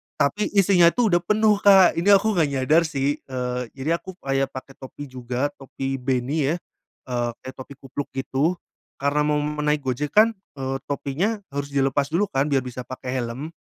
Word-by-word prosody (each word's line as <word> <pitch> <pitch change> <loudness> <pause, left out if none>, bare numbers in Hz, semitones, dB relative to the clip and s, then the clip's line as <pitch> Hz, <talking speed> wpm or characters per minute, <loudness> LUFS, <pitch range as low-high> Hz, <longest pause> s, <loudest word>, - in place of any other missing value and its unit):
tapi 175 +10 +1
isinya 190 -3 +5
itu 240 -4 +2
udah 175 - +5
penuh 210 0 +3
Kak, 195 -4 +6
ini 180 - -2
aku 200 0 +3
gak 160 - +4
nyadar 155 +6 +3
sih, 140 -1 -1
eee, 125 -1 -4
jadi 155 +6 -1
aku 185 +1 -10
kayak 135 0 -1
pake 130 +1 -9
topi 140 +1 -9
juga, 125 +2 -2
topi 135 0 -4
beanie 135 +4 0
ya, - - -1 0.5
eee, 120 -1 -1
kayak 130 - -9
topi 130 +2 -9
kupluk 135 +1 -5
gitu, 135 +5 0 0.5
karena 145 +1 +1
mau 150 0 +1 0.2
naik 150 0 +1
Gojek 135 +3 -3
kan, 220 0 +5 0.2
eee, 135 -1 -3
topinya 165 +10 -2
harus 140 0 -5
dilepas 135 0 +2
dulu 200 +3 +1
kan 135 +1 +1
biar 140 -3 +1
bisa 125 0 -7
pakai 130 0 -5
helm. 125 +6 -4
140 Hz, 180 wpm, -23 LUFS, 130-170 Hz, 0.5 s, Kak